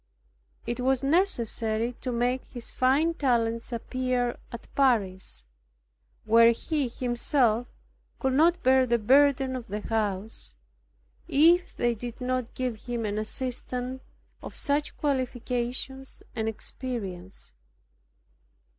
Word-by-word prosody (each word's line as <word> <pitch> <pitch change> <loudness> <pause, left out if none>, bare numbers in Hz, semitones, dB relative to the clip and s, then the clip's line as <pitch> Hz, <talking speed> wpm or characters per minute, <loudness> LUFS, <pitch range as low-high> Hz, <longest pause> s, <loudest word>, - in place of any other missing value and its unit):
It 240 - -3
was 260 +1 +1
necessary 240 - +1
to 255 - -3
make 245 +2 0
his 240 -2 -4
fine 280 +6 +2
talents 235 -6 0
appear 245 +1 -1
at 235 - -9
Paris, 190 - 0 0.8
where 230 +1 +7
he 290 +3 -2
himself 240 -1 +2 0.5
could 265 -1 0
not 335 +5 +3
bear 260 0 +5
the 235 0 +3
burden 265 +3 +4
of 245 -2 -6
the 210 0 -4
house, 215 -1 -3 0.7
if 335 +4 +4
they 240 0 +2
did 235 +2 -7
not 255 -1 -2
give 250 -4 -3
him 240 -2 -2
an 210 0 -1
assistant 250 +2 -3 0.4
of - - -9
such 290 +1 -1
qualifications 255 -1 -3
and 220 -1 -1
experience. 200 - -5
245 Hz, 110 wpm, -27 LUFS, 230-265 Hz, 0.8 s, where